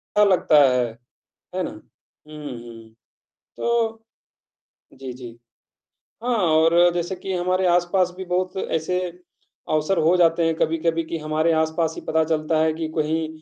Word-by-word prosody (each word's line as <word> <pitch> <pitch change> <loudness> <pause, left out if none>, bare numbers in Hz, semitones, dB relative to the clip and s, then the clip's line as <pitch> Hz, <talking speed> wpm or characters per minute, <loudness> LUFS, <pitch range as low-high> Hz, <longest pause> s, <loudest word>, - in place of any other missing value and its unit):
अच्छा 210 - +5
लगता 170 -5 +4
है, 125 -1 +1 0.7
है - - -1
ना? - - -4
हुँ, 155 0 -18 0.2
हुँ। 115 -1 -12 0.6
तो 225 -1 -1 0.9
जी, 130 -1 -8
जी। 125 -1 -9 0.9
हाँ 245 0 +1 0.2
और 170 +2 +5
जैसे 175 +2 -2
कि 190 +1 -5
हमारे 185 +1 +1
आस-पास 175 +1 +2
भी 190 - -6
बहुत 180 +1 -1
ऐसे 180 0 -1 0.7
अवसर 155 +5 +1
हो 165 +3 +3
जाते 165 -1 +3
हैं 165 0 +1
कभी-कभी 165 +1 0
कि 165 +1 -5
हमारे 155 +2 0
आसपास 160 0 -1
ही - - -7
पता 160 0 +2
चलता 155 0 0
है 160 0 +1
कि 160 0 -4
कहीं, 160 +1 0
165 Hz, 150 wpm, -22 LUFS, 155-180 Hz, 0.9 s, अच्छा